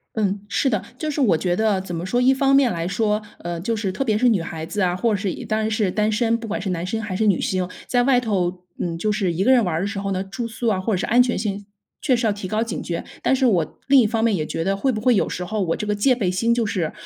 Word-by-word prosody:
嗯， 200 -2 0
是 235 +8 +1
的， 215 -7 0 0.2
就 310 -1 -2
是 290 0 -1
我 200 -10 +4
觉 175 +1 0
得 215 -2 +1
怎 180 -2 -5
么 165 - -4
说， 240 +7 0
一 260 +2 +5
方 275 0 +2
面 275 -3 +5
来 170 -4 -2
说， 210 +3 0 0.2
呃 175 0 -5
就 220 +7 -2
是 210 -3 -2
特 230 +9 -2
别 215 -5 +1
是 250 +2 +4
女 210 -7 +2
孩 160 -1 -6
子 205 +5 -2
啊， 180 -1 +2
或 225 +5 0
者 - - +2
是 195 0 -2
已 - - -8
当 215 -1 -1
然 220 0 0
是 215 -3 +1
单 215 +2 0
身， 230 +1 +2
不 230 - -7
管 215 - -3
是 195 - -4
男 175 -2 -2
生 220 +3 -2
还 205 -4 -4
是 220 - +1
女 200 -4 +3
性， 185 -1 -1 0.2
在 245 -1 +2
外 250 0 +4
头， 185 -6 -1 0.2
嗯， 165 -1 -3
就 215 +4 0
是 200 -4 0
一 170 +3 -1
个 240 - +3
人 250 -4 +5
玩 165 -3 -1
的 195 - -1
时 200 - -4
候 195 0 -3
呢， 185 - -1
住 195 +5 -5
宿 230 +1 -3
啊， 205 -4 +2
或 190 +4 -1
者 185 - +1
是 - - -2
安 245 +2 +5
全 245 -1 -1
性 205 -1 -3 0.4
确 265 - +3
实 235 -1 0
要 215 - +3
提 205 -1 -6
高 215 +4 0
警 230 - -4
觉。 170 -1 -3 0.2
但 - - +3
是 265 0 +2
我 175 -9 0
另 275 0 +6
一 230 - +3
方 225 +1 -1
面 225 -4 +3
也 155 - -1
觉 165 - -3
得 195 +3 0
会 260 +7 +1
不 215 - -3
会 250 +2 +3
有 200 - +2
时 180 - -4
候 210 +1 -2
我 165 -2 0
这 210 - -4
个 210 - 0
戒 230 +6 +3
备 205 -7 -1
心 230 +6 +1
就 235 -2 0
是 175 -6 -2
210 Hz, 345 characters per minute, -22 LUFS, 185-230 Hz, 0.4 s, 另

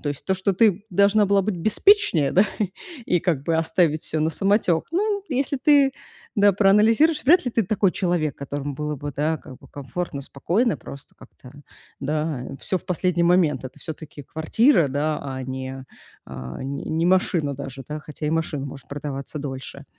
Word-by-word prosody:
то 145 - -2
есть 145 - -7
то, 190 - +2
что 190 +1 0
ты 205 0 +3
должна 200 +3 +4
была 200 0 +3
быть 200 -1 -2
беспечнее, 210 - +3
да, 190 - +5 0.6
и 180 - +2
как 165 -7 0
бы 165 +1 +1
оставить 160 -1 +1
всё 155 - -2
на 155 - +1
самотек. 195 -2 +1
Ну, 405 +5 +1 0.2
если 275 +1 -1
ты, 285 -2 +5 0.4
да, 205 0 +5
проанализируешь, 220 - +4
вряд 350 +5 +5
ли 245 - -1
ты 230 -1 +1
такой 200 -1 +1
человек, 175 -6 -1
которому 140 +1 -4
было 150 +1 -3
бы, 145 +1 -6
да, 155 +3 0
как 130 - -12
бы - - -17
комфортно, 140 +2 -5
спокойно, 185 - 0
просто 140 0 -11
как-то, 125 - -16 0.5
да, 150 -1 -2
э, 135 - -7
всё 185 - -1
в - - -21
последний 180 -1 0
момент. 170 -7 +3
Это 130 - -9
всё-таки 155 -2 -8
квартира, 165 - +2
да, 150 +3 -1
а 130 -2 -5
не, 130 0 -6 0.4
а, 65 - -7
не 140 +1 -5
не 160 +1 0
машина 175 -5 +2
даже, 135 -1 -8
да. 150 0 -4
Хотя 150 0 -7
и - - 0
машина 160 -3 -1
может 140 -1 -10
продаваться 140 0 -6
дольше. 140 0 -7
160 Hz, 185 wpm, -23 LUFS, 140-195 Hz, 0.6 s, да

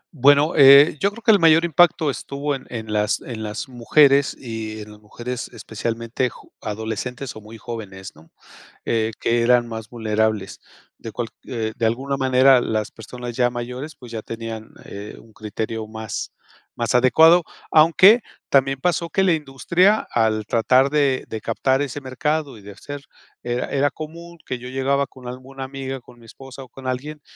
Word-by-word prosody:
Bueno, 145 +3 +4
eh, 140 +1 +8
yo 200 - +2
creo 225 +3 -13
que 220 - +5
el 205 - +5
mayor 165 0 +5
impacto 165 -2 +3
estuvo 140 +2 -4
en 135 -1 -7
en 110 -3 -6
las 105 0 +1
en 115 -3 -7
las 110 +4 -5
mujeres, 140 +3 +3
y 110 -3 -6
en 105 - -10
las 105 - -15
mujeres, 120 +3 -6
especialmente 115 +3 -3
jo - - -17
adolescentes 110 +4 -5
o 110 - -10
muy 110 +2 -12
jóvenes, 105 -5 -8
¿no?, 80 +2 -19 0.6
eh, 110 -1 +1
que 115 0 +1
eran 120 0 +3
más 110 -1 -7
vulnerables, 110 -3 -1 0.3
de 115 - -9
cual 120 -2 -4 0.2
eh, 110 -3 -3
de 115 - 0
alguna 135 +5 -1
manera, 130 -1 +4
las 110 -1 -2
personas 120 +2 -8
ya 125 -1 +2
mayores, 125 +5 -6
pues, 125 -4 -12
ya 110 - -5
tenían, 115 -1 -7 0.2
eh, 100 +1 -9
un 110 -1 -20
criterio 110 +1 -5
más 110 0 -6 0.4
más - - -1
adecuado, 160 +7 +6 0.3
aunque 175 +8 +6 0.3
también 135 -1 +2
pasó 170 0 0
que 190 - +1
la 190 -2 +4
industria, 170 +7 +1
al 110 -2 +1
tratar 130 +5 +3
de 140 -3 +1
de 110 - -5
captar 130 +5 0
ese 145 0 -5
mercado 140 +1 -2
y 105 - -16
de 100 - -10
hacer, 145 +8 -9 0.4
era 120 +1 -2
era 140 +1 +1
común 170 +2 -9
que 130 - -4
yo 125 +1 -9
llegaba 135 +2 0
con 130 -2 -12
alguna 130 +2 -9
amiga, 135 0 -5
con 120 0 -18
mi 115 - -17
esposa, 135 +3 -11
o 130 - -17
con 130 +2 -9
alguien 145 +4 -4
125 Hz, 180 wpm, -22 LUFS, 110-140 Hz, 0.6 s, eh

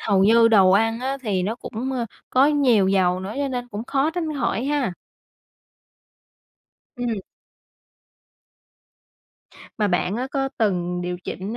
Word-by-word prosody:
hầu 195 -3 +2
như 230 +2 +6
đồ 195 -4 +5
ăn 225 +4 +2
á, 265 +2 -2
thì 195 -5 -1
nó 210 +5 -1
cũng, 250 +2 -5
ơ, 240 -3 -2 0.2
có 265 +2 +5
nhiều 255 -10 +3
dầu 185 -2 +2
nữa, 195 +4 -6
cho 280 -1 -1
nên 245 -1 -4
cũng 215 +2 -6
khó 280 +4 0
tránh 325 -3 -3
khỏi 240 -1 -1
ha. 280 -7 0 2.0
Ừm. 240 -4 -2 2.6
Mà 210 -1 +2
bạn 180 +2 0
á, 250 +2 -2
có 270 -1 -1
từng 180 -5 0
điều 180 0 -3
chỉnh, 205 +5 -5
225 Hz, 145 wpm, -23 LUFS, 195-265 Hz, 2.6 s, như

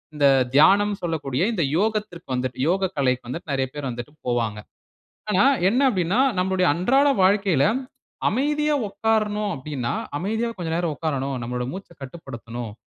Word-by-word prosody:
இந்த 145 -1 +2 0.3
தியானம்னு 200 +7 +5
சொல்லக்கூடிய 150 -4 -1
இந்த 180 -7 0
யோகத்திற்கு 210 -3 -2
வந்துட்டு, 125 0 -3
யோகக்கலைக்கு 145 -10 0
வந்துட்டு 150 +4 -6
நெறைய 135 -1 0
பேர் 145 -2 -4
வந்துட்டு 120 +4 -7
போவாங்க. 115 -3 -1 0.7
ஆனா 200 -1 +4 0.2
என்ன 240 +7 +2
அப்டீன்னா, 190 +2 +1 0.2
நம்முடைய 185 0 +1
அன்றாட 265 - +3
வாழ்க்கையில 190 -6 +3 0.6
அமைதியா 295 +5 +1
உட்காரணும் 210 0 0
அப்டீன்னா, 130 -3 -4 0.3
அமைதியா 220 +7 -1
கொஞ்ச 175 -2 -4
நேரம் 170 -3 -1
உட்காரணும். 140 -4 -2
நம்மோட 125 +1 -3
மூச்ச 190 +1 -8
கட்டுப்படுத்தணும். 120 -5 -7
170 Hz, 130 wpm, -23 LUFS, 135-205 Hz, 0.7 s, தியானம்னு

